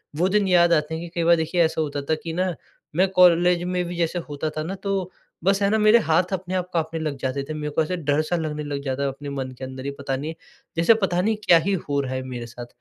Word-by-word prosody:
वो 180 +4 +2
दिन 205 0 +2
याद 175 -2 +5
आते 155 0 +1
हैं 165 - -5
कि 170 - -7
कई - - +2
बार 170 +1 +6
देखिए 165 +2 0
ऐसा 160 0 0
होता 145 -2 -2
था 160 - +3
कि 165 -1 -4
ना 180 0 0 0.4
मैं 190 +2 +4
कॉलेज 175 0 +5
में 180 0 -1
भी 175 0 -5
जैसे 170 +1 0
होता 145 +2 -3
था 155 - -1
न 185 +4 -4
तो 195 -2 -1 0.3
बस 195 +2 +2
है 200 - +3
न 220 +1 +2
मेरे 215 +2 +6
हाथ 170 +4 +2
अपने 185 0 -3
आप 180 0 -2
काँपने 165 0 -1
लग 150 -3 -3
जाते 135 +1 -2
थे। - - -2
मेरे 150 -1 -4
को 160 - +2
ऐसे 180 +3 -3
डर-सा 155 +2 0
लगने 150 -2 -3
लग 145 -1 -4
जाता 135 0 -2
है - - +1
अपने 140 +1 -7
मन 135 -2 -4
के - - -7
अंदर 130 +1 -8
ही 140 - -2
पता 135 -1 -2
नहीं 155 +4 -4 0.4
जैसे 170 +7 +6
पता 180 -1 +2
नहीं 220 +2 +1
क्या 170 - +7
ही 200 - +2 0.2
हो 140 0 +1
रहा 130 -1 -4
है 130 - -2
मेरे 125 -2 -6
साथ। 120 +1 -9
165 Hz, 275 wpm, -23 LUFS, 145-180 Hz, 0.4 s, क्या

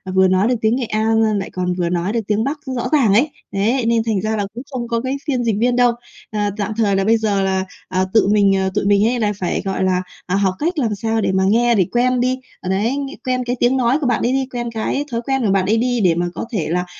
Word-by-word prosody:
vừa 190 0 +5
nói 185 +3 +2
được 250 - +2
tiếng 220 +2 +2
Nghệ 255 -1 -2
An 220 +1 +1
l 215 -2 +2
lại 195 - -5
còn 180 -1 -1
vừa 175 -1 -1
nói 180 +3 -1
được 230 - 0
tiếng 210 +1 +1
Bắc 290 +3 -2 0.2
rõ 240 - -2
ràng 265 -10 +4
ấy, 250 +9 +3 0.2
đấy, 225 +6 0
nên 230 -1 +2
thành 220 -4 -1
ra 220 +2 -1
là 205 - -1
cũng 240 +3 -7
không 245 -3 -4
có 230 -1 -1
cái 260 +2 -2
phiên 255 -4 0
dịch 225 -3 +1
viên 245 +2 +2
đâu. 245 -1 +4 0.4
Ờ, 215 - -3 0.2
tạm 210 +1 -2
thời 205 -3 +2
là 195 - +1
bây 225 +3 +3
giờ 210 -3 0
là, 190 0 0 0.2
ờ, 185 0 0
tự 220 - +4
mình, 200 -1 +4
ờ 190 0 0
tụi 210 - 0
mình 205 +1 +4
hay 245 +1 +1
là 210 -2 +1
phải, 180 - -1
gọi 190 -1 -1
là, 185 -1 +1 0.2
à, 185 - -1
học 195 -2 +2
cách 335 +3 -1
làm 225 -6 0
sao 225 +2 -1
để 195 - +1
mà 190 0 +1
nghe 235 +3 +3
để 190 -4 +3
quen 250 +1 +2
đi, 255 +1 0 0.2
ờ, 185 - -5
đấy, 215 +8 0
ng 280 -1 -3 0.2
quen 255 -1 0
cái 245 +1 -1
tiếng 250 +2 +3
nói 250 +1 +2
của 275 - 0
bạn 240 -3 +1
ấy 245 - +1
đi, 265 0 +1
quen 240 -1 -3
cái 230 +6 -2
thói 230 - -2
quen 270 +2 -1
của 200 - +2
bạn 195 -1 +2
ấy 215 +4 +2
đi 245 +1 0
để 175 -3 +4
mà 175 +1 0
có - - -4
thể 195 -10 -2
là, 180 +2 0
220 Hz, 295 wpm, -19 LUFS, 195-245 Hz, 0.4 s, vừa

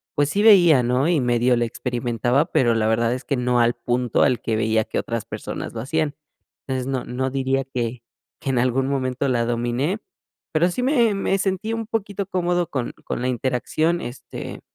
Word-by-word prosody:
pues 145 0 +2
sí 200 +6 0
veía, 175 - +7
¿no? 125 +5 +1
Y 170 -4 +3
medio 120 0 +2
le 120 0 +1
experimentaba, 120 +2 0
pero, 120 -3 +3
la 110 -1 +1
verdad 115 +1 +2
es 130 - -5
que 140 - -1
no 125 0 +1
al 120 0 +4
punto 120 0 0
al 125 - +2
que 110 - -1
veía 110 0 +2
que - - -5
otras 115 -2 -3
personas - - -6
lo 110 - -4
hacían. 150 +2 -1 0.5
Entonces, 130 -1 -2
no 130 -2 -2
no 130 +2 -2
diría 135 0 0
que 120 -2 -4 0.4
que 135 - -4
en 125 - 0
algún 130 +2 +1
momento 130 -1 -1
la 120 -2 +1
dominé, 120 - -1 0.5
pero, 170 +3 +3
sí 250 - -2
me 240 -6 +3
me 195 0 0
sentí 200 +3 -1
un 225 -1 -3
poquito 205 -3 -3
cómodo 175 -2 0
con 130 -6 -3
con - - -3
la 125 - 0
interacción, 130 +7 0
este, 120 +2 -7
130 Hz, 195 wpm, -22 LUFS, 120-160 Hz, 0.5 s, veía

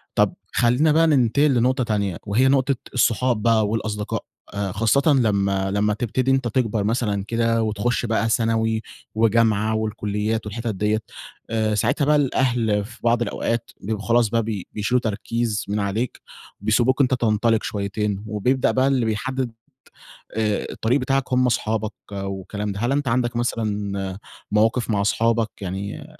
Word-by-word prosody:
طَب - - +3 0.2
خلّينا 125 +6 +3
بقى 165 +1 +4
ننتقل 140 +1 +3
لنقطة 130 +2 +2
تانية، 100 -6 -1
وهي 115 +6 +3
نقطة 135 0 +3 0.2
الصحاب 120 -1 +2
بقى 110 -1 +3
والأصدقاء، 105 -1 -3 0.3
آآ، 100 -2 -2
خاصة 115 +7 +2
لمّا 100 -6 +1
لمّا 105 +1 +1
تبتدي 125 +4 0
أنت 135 -2 +1
تكبر 115 -3 0
مثلًا 105 -2 0
كده، 115 0 +1
وتخُشّ 110 +3 -1
بقى 115 0 0
ثانوي 110 -1 +1 0.3
وجامعة 110 -1 +2
والكليات 110 0 -2
والحتت 110 +1 -4
ديَّة، 105 +3 0 0.5
آآ، 110 -1 0
ساعتها 125 +7 +1
بقى، 150 +1 +4
الأهل 120 -7 +1
في 115 +2 -13
بعض 120 0 +2
الأوقات 115 +1 -2
بيبقوا 105 +1 -4
خلاص 115 -2 +3
بقى 115 0 +1
بي 105 -4 -4
بيشيلوا 110 +4 +1
تركيز 110 0 -2
من 105 +1 -1
عليك 105 +5 -2 0.4
وبيسيبوك 125 +5 +2
أنت 130 -1 +2
تنطلق 115 -2 +2
شويتين، 100 0 -2
وبيبدأ 120 +5 +1
بقى 130 +1 +2
اللي 130 -4 +2
بيحدّد 120 +4 -2 0.9
آآ، 105 -2 0
الطريق 125 +5 +1
بتاعك 135 0 -1
هم 125 0 +3
أصحابك 110 -2 -1 0.2
والكلام 100 +1 -4
ده، 100 - -6
هل 120 +3 +1
أنت 140 -1 0
عندك 120 0 0
مثلًا 100 -5 -2 0.3
مواقف 110 +3 +2
مع 105 -2 +1
أصحابك 115 +2 +1
يعني 95 +2 -5
110 Hz, 150 wpm, -22 LUFS, 105-120 Hz, 0.9 s, بقى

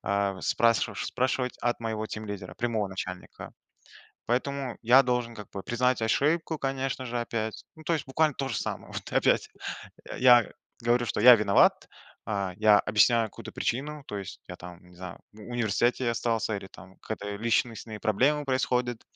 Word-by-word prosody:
э, 100 -1 -1
спрасши 115 -1 +2
спрашивать 130 0 -1
от 120 0 -1
моего 110 -1 -3
тимлидера, 105 -2 -7
прямого 115 -4 -1
начальника. 95 -1 -7 0.7
Поэтому 130 +1 -2
я 125 +4 +7
должен 125 -2 -1
как 105 - -9
бы 95 - -6
признать 125 0 0
ошибку, 155 +8 +1
конечно 135 -1 -2
же, 120 0 -3
опять, 110 -2 -4
ну, 160 - -14
то 170 - 0
есть 155 - -2
буквально 150 +2 +1
то 135 - -2
же 120 - -3
самое, - - -5
вот - - -6
опять. - - +2 0.6
Э, - - -7
я 120 -2 +6 0.3
говорю, 120 +1 +2
что 105 - -2
я 125 +2 +10
виноват, 100 -2 +3 0.4
а, 100 -3 -2
я 105 0 +6
объясняю 115 +2 +3
какую-то - - -10
причину, 145 +4 -3
то 105 - -5
есть 100 - -8
я - - -7
там, 90 0 -10
не 90 - -18
знаю, 90 -1 -8
в 110 - -16
университете 120 +2 0
остался 115 -2 -1
или 100 - -8
там 95 -1 -15
какие-то 105 -2 -5
личностные 115 -2 -1
проблемы 135 +9 +2
происходят, 125 -3 0
115 Hz, 165 wpm, -28 LUFS, 105-125 Hz, 0.7 s, я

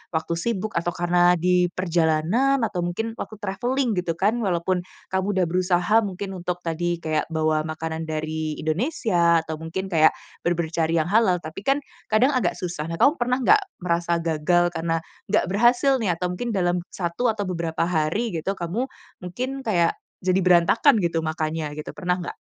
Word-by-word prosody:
waktu 160 +1 -1
sibuk 215 0 -2
atau 175 +1 -3
karena 175 0 +3
di 180 +1 +2
perjalanan, 175 - +1
atau 205 -5 -1
mungkin 175 +6 -2
waktu 215 - -6
traveling 245 +5 0
gitu 170 -2 -2
kan, 210 +7 +1
walaupun 180 -2 -1 0.2
kamu 190 0 0
udah 185 -2 +3
berusaha 180 +3 +2
mungkin 195 -2 -4
untuk 180 -1 -4
tadi 175 +1 -1
kayak 155 -1 0
bawa 155 -1 0
makanan 160 0 -4
dari 155 0 -3
Indonesia, 170 - +1
atau 160 -1 -6
mungkin 190 +4 -5
kayak 160 -1 +5 0.3
bener-bener 170 -2 0
cari 165 0 0
yang 165 +3 0
halal, 195 -6 +3
tapi 155 +4 -7
kan 275 +7 0 0.2
kadang 240 +6 +3
agak 245 -10 0
susah. 170 -4 -4
Nah, 165 - -3
kamu 285 - +3
pernah 250 +1 +1
enggak 425 0 +6 0.2
merasa 170 0 +1
gagal 175 +2 +2
karena 165 -1 -2 0.2
enggak 210 0 +2
berhasil 245 +5 +3
nih 185 -7 0
atau 180 +1 -2
mungkin 230 +4 -3
dalam 175 -1 +1
satu 175 +7 -2
atau 215 -2 0
beberapa 170 -3 -2
hari 175 +7 0
gitu 175 +4 -2
kamu 190 +10 -2 0.3
mungkin 255 +10 -4
kayak 180 -9 +2 0.3
jadi 185 +1 +1
berantakan 185 - +5
gitu 170 -4 0
makannya 155 -1 -3
gitu, 150 - -6
pernah 180 -2 -1
enggak? 175 - -6
175 Hz, 170 wpm, -24 LUFS, 165-210 Hz, 0.3 s, enggak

